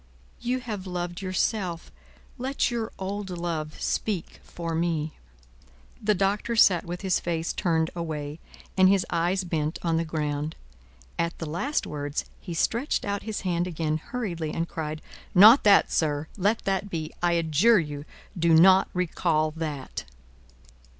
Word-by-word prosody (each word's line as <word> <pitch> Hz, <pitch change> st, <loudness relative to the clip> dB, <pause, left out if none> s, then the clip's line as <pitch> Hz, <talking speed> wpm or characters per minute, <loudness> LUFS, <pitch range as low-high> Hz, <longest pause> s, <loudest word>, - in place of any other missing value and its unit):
You 255 Hz, +1 st, -1 dB
have 210 Hz, -6 st, -5 dB
loved 175 Hz, 0 st, -4 dB
yourself; 185 Hz, -2 st, -1 dB, 0.5 s
let 260 Hz, 0 st, 0 dB
your 230 Hz, -2 st, -2 dB
old 195 Hz, +1 st, -4 dB
love 170 Hz, -3 st, -4 dB
speak 195 Hz, -7 st, -2 dB
for 165 Hz, -1 st, -5 dB
me!" 160 Hz, -2 st, -1 dB, 0.9 s
The 210 Hz, 0 st, +2 dB
Doctor 200 Hz, +5 st, 0 dB
sat 185 Hz, -5 st, +5 dB
with 175 Hz, +1 st, -5 dB
his 190 Hz, -3 st, +1 dB
face 165 Hz, -1 st, -2 dB
turned 160 Hz, -3 st, +1 dB
away, 155 Hz, -3 st, -4 dB, 0.4 s
and 185 Hz, -1 st, +6 dB
his 195 Hz, -2 st, +3 dB
eyes 175 Hz, +3 st, +1 dB
bent 160 Hz, -2 st, -2 dB
on 165 Hz, -2 st, +1 dB
the 165 Hz, -, +1 dB
ground. 150 Hz, -1 st, -2 dB, 0.6 s
At 170 Hz, 0 st, -1 dB
the 165 Hz, -, -5 dB
last 180 Hz, -, -1 dB
words, 145 Hz, 0 st, -3 dB
he 175 Hz, -3 st, -6 dB
stretched 235 Hz, -, 0 dB
out 200 Hz, 0 st, -2 dB
his 220 Hz, -1 st, -4 dB
hand 175 Hz, -2 st, 0 dB
again, 160 Hz, -3 st, -1 dB
hurriedly, 170 Hz, -7 st, -4 dB
and 165 Hz, +1 st, -2 dB
cried: 155 Hz, -1 st, -5 dB, 0.3 s
"Not 220 Hz, +8 st, +9 dB
that, 200 Hz, -1 st, +6 dB
sir! 150 Hz, -1 st, 0 dB
Let 205 Hz, +3 st, 0 dB
that 195 Hz, +1 st, 0 dB
be! 160 Hz, -3 st, -4 dB
I 175 Hz, 0 st, +3 dB
adjure 170 Hz, +7 st, +4 dB
you, 145 Hz, -3 st, -4 dB, 0.3 s
do 170 Hz, -2 st, +4 dB
not 190 Hz, +3 st, +6 dB
recall 155 Hz, -3 st, +1 dB
that!" 150 Hz, -4 st, -5 dB
175 Hz, 150 wpm, -26 LUFS, 160-195 Hz, 0.9 s, Not